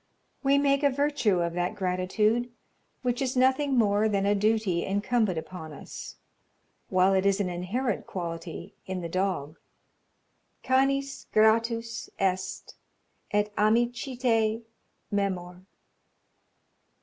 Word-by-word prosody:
We 275 0 +3
make 280 0 +3
a 285 - +4
virtue 275 -9 +1
of 170 0 -2
that 175 +1 -1
gratitude 210 +6 0 0.5
which 245 0 0
is 260 -1 -1
nothing 265 +1 +3
more 210 -1 +3
than 200 -1 +1
a 200 - +3
duty 205 -4 +1
incumbent 205 -1 0
upon 160 -1 -7
us, - - -9 0.7
while 185 +1 +4
it 190 0 +2
is 200 0 +2
an 195 -3 0
inherent 195 +7 -2
quality 170 0 -6
in 185 -1 -3
the 170 - -4
dog. 175 -5 -2 1.0
"Canis 275 +1 +1
gratus 230 +1 +2
est, 190 -1 -2 0.6
et 210 0 0
amicitiæ 230 0 +1 0.5
memor." 185 -2 -2
210 Hz, 115 wpm, -27 LUFS, 185-245 Hz, 1.0 s, a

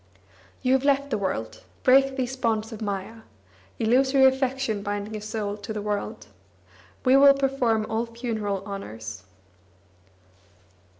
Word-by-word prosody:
You 255 0 +3
have 265 0 +2
left 280 0 +2
the 220 - +1
world; 115 - -3 0.2
break 270 +1 +5
these 260 -1 -2
bonds 225 -3 -1
of 220 - -8
maya 200 +1 -4 0.6
(Illusory 265 +4 +4
affection 265 -4 +1
binding 205 +1 -4
a 210 - -5
soul 210 -1 -4
to 205 +1 -7
the 215 - -3
world). 205 - -3 0.8
We 255 +1 +6
will 275 0 +7
perform 260 -5 +1
all 225 +1 -1
funeral 220 -5 -3
honours." 110 - -7
225 Hz, 130 wpm, -25 LUFS, 205-265 Hz, 0.8 s, will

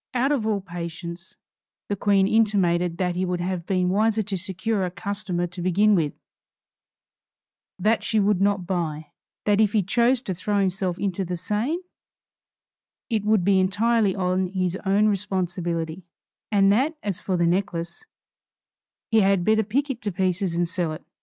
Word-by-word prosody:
Out 260 +3 +2
of 245 -7 0
all 210 -2 0
patience, 170 0 -7 0.5
the 205 - -1
Queen 195 -1 +3
intimated 180 -6 +2
that 180 -1 0
he 180 - -1
would 180 -1 -1
have 180 -1 -3
been 185 -2 +1
wiser 215 +3 +2
to 200 0 -4
secure 190 +3 -2
a 180 - -1
customer 185 -1 -3
to 175 +1 -7
begin 200 +4 +3
with; 160 -6 +1 1.6
that 215 +5 +2
she 220 - 0
would 200 -2 +2
not 200 -2 +1
buy; 160 -5 -3 0.3
that 205 0 +3
if 210 -1 +2
he 210 -3 +3
chose 240 +6 +2
to 190 - -3
throw 205 +4 -1
himself 190 -2 0
into 195 -1 -2
the 180 0 -4
Seine 220 - -2 1.3
it 220 -3 +1
would 215 -3 +3
be 195 -1 +4
entirely 205 +2 +2
on 185 -1 0
his 185 -1 -1
own 200 +2 +4
responsibility; 180 -4 -2 0.5
and 195 -1 +4
that 275 +9 +1
as 200 -4 -2
for 185 -2 -1
the 170 - +2
necklace, 170 - -2 1.1
he 225 - +5
had 195 -2 +2
better 220 0 +4
pick 270 +7 -1
it 245 - -7
to 205 - -2
pieces 185 -1 0
and 175 0 +1
sell 170 -3 -2
it. 155 - -9
190 Hz, 165 wpm, -24 LUFS, 180-210 Hz, 1.6 s, he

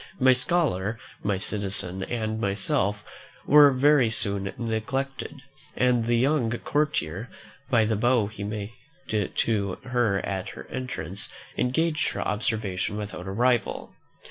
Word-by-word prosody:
My 130 -1 +6
scholar, 125 - 0 0.2
my 100 -2 0
citizen, 95 -2 +1
and 110 -2 -3
myself, 100 0 0 0.4
were 145 0 +8
very 135 -2 +4
soon 100 -3 -1
neglected; 130 +4 -3 0.3
and 125 -2 +3
the 120 0 +3
young 130 -1 +2
courtier, 120 - -1 0.4
by 115 -3 +4
the 110 0 +1
bow 120 +1 +3
he 100 0 -7
made 105 0 -4 0.4
to 105 -2 0
her 120 -6 +1
at 95 -2 -3
her - - -9
entrance, 105 -7 -3 0.3
engaged 155 +5 +1
her - - -3
observation 105 -3 -1
without 105 -3 -6
a - - -3
rival. 120 +1 0
110 Hz, 125 wpm, -26 LUFS, 100-130 Hz, 0.4 s, were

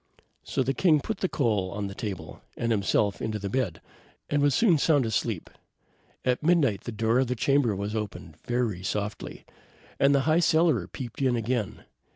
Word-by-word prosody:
So 135 - -1
the 135 +2 0
king 155 -1 +4
put 220 +9 -4
the 185 - 0
coal 105 -9 0
on 100 +1 -4
the 100 - -5
table, 100 -3 -6 0.2
and 115 0 -1
himself 100 -1 +1
into 110 -1 -2
the 100 -1 -5
bed, 130 0 -1 0.5
and 145 0 +2
was 145 -2 +3
soon 180 -9 +4
sound 145 -4 +3
asleep. 110 -2 -2 0.8
At 125 -1 +1
midnight 150 - +2
the 120 - -4
door 115 +2 +1
of 130 - +2
the 125 - -1
chamber 135 0 +2
opened 100 -6 -5
very 120 -7 -1
softly, 105 +2 -4 0.5
and 140 +1 +5
the 140 - +3
High 155 +4 +3
Cellarer 160 - +3
peeped 120 +4 -7
in 130 -2 +2
again. 115 -2 -2
120 Hz, 180 wpm, -27 LUFS, 105-140 Hz, 0.8 s, and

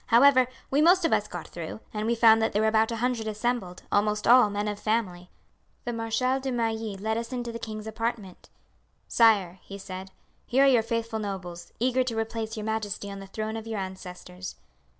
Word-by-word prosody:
However, 255 +1 +6 0.2
we 280 +2 +3
most 350 +2 +5
of - - +2
us - - +1
got - - -7
through; - - -7
and 215 0 -2
we 235 - +2
found 225 -1 +6
that 225 - +1
there 210 - +2
were - - +3
about 220 0 +3
a - - -1
hundred 235 -1 -1
assembled, 215 -4 -2
almost 210 +1 +1
all 245 -3 +7
men 205 +1 -2
of 205 -1 -3
family. 185 -6 -1 0.6
The 240 - -2
Marshal 230 +3 0
de 265 0 -3
Mailly 225 -3 -2
led 220 +3 -1
us 230 +1 -6
into 240 -2 -3
the 230 - -6
king's 215 -1 -6
apartment. 220 -3 -4 0.6
"'Sire,' 200 -6 +4
he 200 - -9
said, 190 -1 -8 0.4
'here 265 +3 +4
are - - +6
your 255 -4 +5
faithful 230 0 -2
nobles, 190 -4 -6
eager 255 +2 +2
to 235 -3 -3
replace 225 0 -3
your 210 - -4
majesty 210 -2 -3
on 200 - -7
the 195 - -9
throne 215 +2 -4
of 225 0 -6
your 220 -1 -3
ancestors.' 185 -1 -7
220 Hz, 205 wpm, -27 LUFS, 205-235 Hz, 0.6 s, all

